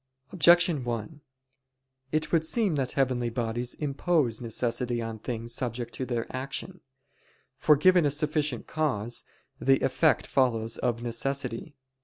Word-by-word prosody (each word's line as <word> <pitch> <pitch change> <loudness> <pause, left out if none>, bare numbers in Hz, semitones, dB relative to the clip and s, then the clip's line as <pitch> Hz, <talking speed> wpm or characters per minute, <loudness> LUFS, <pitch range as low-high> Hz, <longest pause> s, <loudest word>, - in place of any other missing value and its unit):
Objection 175 -4 +5
1: 120 +5 -4 0.9
It 155 0 0
would 165 -2 +3
seem 205 +2 +1
that 135 -4 -1
heavenly 125 -3 +1
bodies 120 +1 -3
impose 145 -4 0
necessity 120 +1 -1
on 115 -1 -5
things 115 0 -4
subject 120 -1 -3
to 130 - -4
their 120 -2 -1
action. 140 +7 -5 0.8
For 150 - +5
given 180 +4 +5
a 145 - +3
sufficient 150 -3 0
cause, 120 -8 -2 0.3
the 135 0 +3
effect 135 +4 +2
follows 115 -4 0
of 120 -1 -1
necessity. 125 +3 -3
130 Hz, 130 wpm, -28 LUFS, 120-150 Hz, 0.9 s, Objection